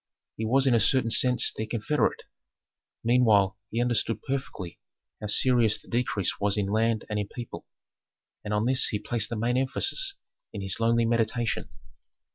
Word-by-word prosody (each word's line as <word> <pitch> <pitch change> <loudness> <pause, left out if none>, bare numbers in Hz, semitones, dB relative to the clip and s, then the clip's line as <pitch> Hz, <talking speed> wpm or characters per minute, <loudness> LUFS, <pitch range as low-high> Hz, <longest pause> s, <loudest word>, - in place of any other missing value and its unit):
He 110 - -3
was 135 +4 +3
in 130 - +4
a 115 - +4
certain 115 +2 +2
sense 125 +3 +3
their 110 - -4
confederate. 115 +7 0 0.8
Meanwhile 110 -5 +3
he 115 - -2
understood 120 -2 0
perfectly 130 - -5 0.4
how 105 - -4
serious 115 0 +3
the - - -23
decrease 115 -5 -1
was 100 0 +1
in 105 - +1
land 110 +1 +1
and 105 -1 -2
in 105 - -2
people, 120 +1 -8 0.8
and 105 - -5
on 105 +1 +1
this 130 +1 +4
he 105 - -1
placed 110 +1 -2
the 120 - -3
main 120 +3 0
emphasis 380 - -1 0.4
in 100 - -5
his 95 +3 -4
lonely 115 0 +2
meditation. 115 0 0
115 Hz, 165 wpm, -27 LUFS, 105-125 Hz, 0.8 s, in